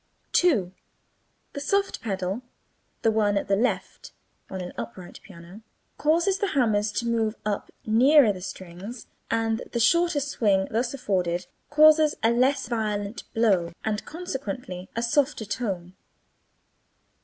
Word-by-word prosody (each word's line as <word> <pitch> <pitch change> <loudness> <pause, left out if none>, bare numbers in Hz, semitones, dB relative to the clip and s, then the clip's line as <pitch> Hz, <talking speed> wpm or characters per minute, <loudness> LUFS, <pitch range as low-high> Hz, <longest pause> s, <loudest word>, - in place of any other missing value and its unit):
2. 235 - +3 0.8
The 285 - -4
soft 395 +7 0
pedal 195 0 -3 0.6
(the 225 - +4
one 210 -2 +2
at 200 - -2
the 195 - +3
left) 235 +6 -2 0.4
in 190 - -5
an 180 -1 -6
upright 120 +10 -8
piano 180 +2 -13 0.4
causes 340 +6 +2
the 405 - +1
hammers 215 -4 +2
to 235 - -2
move 225 -2 0
up 205 -1 -2 0.2
nearer 245 +1 +5
the 185 - -9
strings, 190 +6 -8 0.2
and 225 0 0
the 235 - 0
shorter 340 +6 +3
swing 210 -9 +1
thus 240 +2 0
afforded 180 -7 -1 0.2
causes 305 +1 +6
a 225 - +4
less 265 +3 +2
violent 210 -2 -3
blow 190 -7 +2
and 215 -1 -1
consequently 245 - -6
a 230 - -1
softer 260 -1 +1
tone. 190 -5 -4
220 Hz, 130 wpm, -26 LUFS, 195-265 Hz, 0.8 s, causes